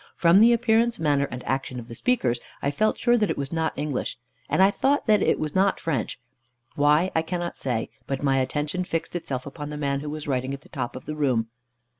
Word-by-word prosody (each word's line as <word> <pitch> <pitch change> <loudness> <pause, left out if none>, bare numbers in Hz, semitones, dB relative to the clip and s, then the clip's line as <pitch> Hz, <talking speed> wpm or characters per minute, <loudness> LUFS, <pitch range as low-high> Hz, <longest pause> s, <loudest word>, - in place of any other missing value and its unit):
From 170 +2 +5
the 230 +2 +7
appearance, 235 0 +3
manner, 145 -3 +1
and 125 0 -7
action 130 -2 -2
of 115 - -9
the 120 - -8
speakers, 125 - +1 0.2
I 140 - 0
felt 215 +9 +1
sure 240 -1 +3
that 210 - +1
it - - -1
was 140 +2 -4
not 160 -1 0
English, 145 -3 -2 0.3
and 190 - +4
I 195 - +6
thought 280 +6 +1
that 210 -3 +4
it - - +3
was 150 -1 -3
not 195 +1 +2
French. 145 -10 -2 0.6
Why, 150 +5 +3
I 160 - +2
cannot 175 +1 -3
say; 120 -4 -2 0.2
but 135 0 -3
my 135 -1 +3
attention 150 +7 -1
fixed 165 -1 -3
itself 135 -7 -3
upon 145 +1 -7
the 150 - -5
man 140 -2 -1
who 150 +1 -5
was 150 0 -6
writing 130 0 -1
at 140 - -13
the - - -19
top 130 -5 -4
of 130 - -8
the 155 - -4
room. 125 -7 +1
150 Hz, 230 wpm, -25 LUFS, 135-185 Hz, 0.6 s, the